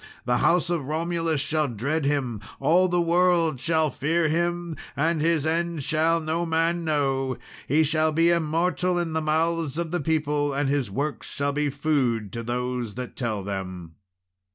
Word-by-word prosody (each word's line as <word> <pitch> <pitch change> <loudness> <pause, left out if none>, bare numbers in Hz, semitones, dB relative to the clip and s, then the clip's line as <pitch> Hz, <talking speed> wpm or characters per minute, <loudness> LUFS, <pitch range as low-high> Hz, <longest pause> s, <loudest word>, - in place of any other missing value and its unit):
The 125 0 +2
house 175 0 +2
of 160 -6 -1
Romulus 165 0 -1
shall 155 +1 0
dread 140 +7 -2
him 130 -7 -1 0.2
all 170 +7 +4
the 175 -1 +1
world 170 -3 +2
shall 160 +1 +1
fear 160 +6 +1
him 170 +1 -1 0.2
and 160 +2 +1
his 160 -2 +2
end 165 -1 -1
shall 160 +3 +2
no 160 +2 -1
man 165 +1 0
know; 135 -4 0 0.3
he 155 +4 +4
shall 155 +1 +2
be 165 +2 +3
immortal 170 +2 +1
in 170 -2 -1
the 160 - 0
mouths 160 -1 0
of 170 -2 -2
the 175 -2 -1
people, 150 -2 0
and 140 -1 0
his 140 -5 0
works 140 +8 -3
shall 140 0 -2
be 150 0 0
food 135 -8 0
to 115 - -3
those 125 -1 -3
that 125 0 -6
tell 110 -6 -2
them. 95 -4 -5
155 Hz, 170 wpm, -25 LUFS, 135-165 Hz, 0.3 s, all